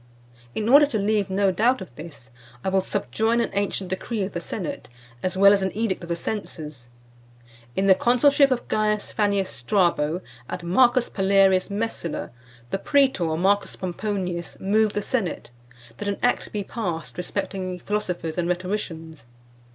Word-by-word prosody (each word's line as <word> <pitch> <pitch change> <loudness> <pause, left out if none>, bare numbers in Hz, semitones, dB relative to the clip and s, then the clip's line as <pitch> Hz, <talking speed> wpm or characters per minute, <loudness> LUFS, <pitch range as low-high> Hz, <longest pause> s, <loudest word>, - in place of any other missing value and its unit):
In 215 - -1
order 285 +4 +7
to 245 - -1
leave 205 -1 +1
no 195 0 +2
doubt 235 +8 +2
of 185 -10 -10
this, 145 -5 -11 0.3
I - - 0
will 190 0 +2
subjoin 220 +4 0
an 235 - 0
ancient 195 -2 -1
decree 205 +3 -2
of 190 - -3
the 175 - -3
senate, 175 -4 -5 0.3
as 185 0 -2
well 200 +1 +7
as 200 - +2
an 190 0 0
edict 220 -5 -1
of 170 - -9
the 170 - 0
censors: 155 - -6 0.9
"In 195 - +1
the 195 - +8
consulship 275 +7 +4
of 255 -2 -1
Caius 210 -1 0
Fannius 200 -2 +1
Strabo, 170 - +1 0.3
and 175 - -5
Marcus 240 +7 +4
Palerius 195 -1 +3
Messala: 205 -5 -3 0.4
the 195 - -1
praetor 195 - +2
Marcus 200 +4 +1
Pomponius 180 -2 -4
moved 210 +2 +2
the 205 - -1
senate, 195 - -2 0.5
that 205 - -5
an 200 - -1
act 245 - +1
be 205 -1 -2
passed 175 -7 -4
respecting 185 +1 -3
Philosophers 180 -4 -3
and 175 0 0
Rhetoricians. 170 - -4
195 Hz, 160 wpm, -24 LUFS, 175-215 Hz, 0.9 s, the